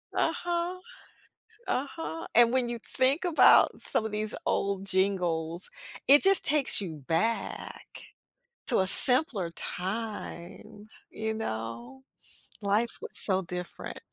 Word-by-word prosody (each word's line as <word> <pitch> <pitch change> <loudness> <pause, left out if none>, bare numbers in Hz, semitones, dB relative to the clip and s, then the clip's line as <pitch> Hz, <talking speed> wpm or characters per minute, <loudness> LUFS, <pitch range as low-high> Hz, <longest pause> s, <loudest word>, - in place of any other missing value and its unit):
Uh-huh. 345 +2 -1 0.9
Uh-huh. 325 +4 -4
And 235 0 +5
when 255 -2 +1
you 235 0 -4
think 265 - 0
about 345 -3 +6
some 220 - -1
of 220 - -4
these 215 0 -3
old 195 -1 -1
jingles, 180 -3 0 0.4
it 285 +2 +8
just 390 0 +5
takes 290 -6 +2
you 160 -7 -7
back 220 +8 -2 0.8
to 245 - +2
a 190 - +1
simpler 245 - +3
time, 205 +1 -5 0.2
you 220 0 -3
know. 115 - -6 0.6
Life 210 +3 0
was - - -6
so 190 -1 +3
different. 180 0 -7
215 Hz, 115 wpm, -28 LUFS, 185-260 Hz, 0.9 s, it